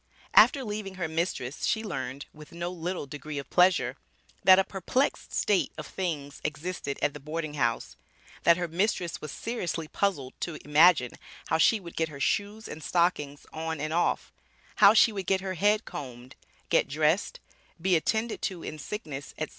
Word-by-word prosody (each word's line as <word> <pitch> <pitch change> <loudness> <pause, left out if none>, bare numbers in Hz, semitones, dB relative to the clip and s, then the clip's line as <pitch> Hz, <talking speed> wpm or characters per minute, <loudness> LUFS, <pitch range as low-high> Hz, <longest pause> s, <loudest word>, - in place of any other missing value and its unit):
After 275 -3 +7
leaving 210 -3 -5
her 180 -3 -2
mistress 160 -5 -3
she 220 0 +1
learned, 135 - -5
with 150 -1 -13
no 170 +1 -4
little 180 -1 -4
degree 145 +1 -7
of 140 - -6
pleasure, 180 0 +3 0.5
that 185 0 +8
a 195 - +5
perplexed 200 +9 -1
state 200 -3 +1
of 155 - -6
things 150 -7 -4
existed 150 -1 -4
at 145 - +2
the 150 - -8
boarding 155 +1 -4
house; 120 -5 -1 0.4
that 170 0 +5
her 175 -1 -2
mistress 175 0 -1
was 150 - -6
seriously 175 -9 -3
puzzled 155 -9 -1
to 170 -3 -4
imagine 150 -3 +5 0.4
how 160 - +2
she 220 +7 +5
would 170 -3 -11
get 160 0 0
her 140 -2 -10
shoes 205 +8 -1
and 155 - -8
stockings 150 -5 0
on 160 0 -3
and 155 +2 -2
off; 175 - 0 0.4
how 200 +2 +8
she 225 - +6
would 195 -4 -5
get 190 -1 +2
her 190 -1 -3
head 210 +5 +2
combed, 125 -2 -8 0.3
get - - +3
dressed, 155 +6 +1 0.4
be 185 +1 +2
attended 220 +7 0
to 180 -4 -3
in 155 - -6
sickness, 150 -5 -6
etc. 155 - -3
165 Hz, 175 wpm, -28 LUFS, 150-190 Hz, 0.5 s, that